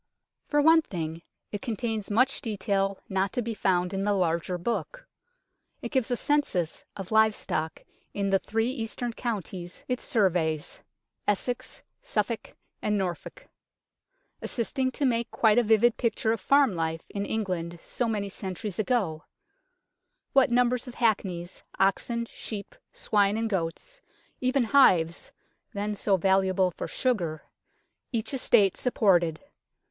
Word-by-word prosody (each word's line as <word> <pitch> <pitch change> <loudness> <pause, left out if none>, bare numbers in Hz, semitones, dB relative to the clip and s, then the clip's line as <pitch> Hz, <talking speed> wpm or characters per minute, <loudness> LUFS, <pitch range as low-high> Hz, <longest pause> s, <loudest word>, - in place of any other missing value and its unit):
For 295 -1 +2
one 320 +1 +7
thing, 165 - -5 0.3
it 205 - -4
contains 225 -3 -3
much 255 +6 +2
detail 195 -2 -1
not 190 0 0
to 245 - -1
be 230 0 -3
found 180 -3 +1
in 195 0 -1
the 205 0 +2
larger 180 -1 0
book. - - -3 0.8
It - - -4
gives 260 -5 +1
a 245 - 0
census 250 - 0
of 195 0 -7
live 220 -1 +5
stock 155 +1 -3 0.3
in 200 -1 -1
the 195 - +4
three 225 +5 -1
eastern 240 -1 -4
counties 190 -7 -5
it 250 -1 -1
surveys 170 - 0 0.5
Essex, 235 +4 -2 0.2
Suffolk - - -2 0.3
and 210 0 +1
Norfolk 190 - -4 0.9
assisting 260 +2 -1
to 285 - -1
make 235 -2 +1
quite 220 0 +4
a - - +3
vivid 225 +1 +4
picture 230 -1 0
of 225 - -4
farm 275 +1 +4
life 165 -1 -2
in 200 - -2
England 180 -6 -2
so 240 - -2
many 210 -3 -1
centuries 195 0 -5
ago; 195 -8 0 1.1
what 270 -1 +5
numbers 245 +1 +2
of 250 - -8
hackneys, 190 -6 -1 0.2
oxen, 235 +5 +1
sheep, 210 -3 -7 0.2
swine 205 0 +1
and 225 0 -1
goats, 195 - -3 0.4
even 255 +1 +2
hives 180 -10 +4 0.4
(then 205 +1 -2
so 200 -1 +1
valuable 190 0 +2
for - - -5
sugar) 175 - -1 0.7
each 230 +1 -2
estate 220 -7 +3
supported. 175 -10 +2
210 Hz, 135 wpm, -27 LUFS, 185-240 Hz, 1.1 s, one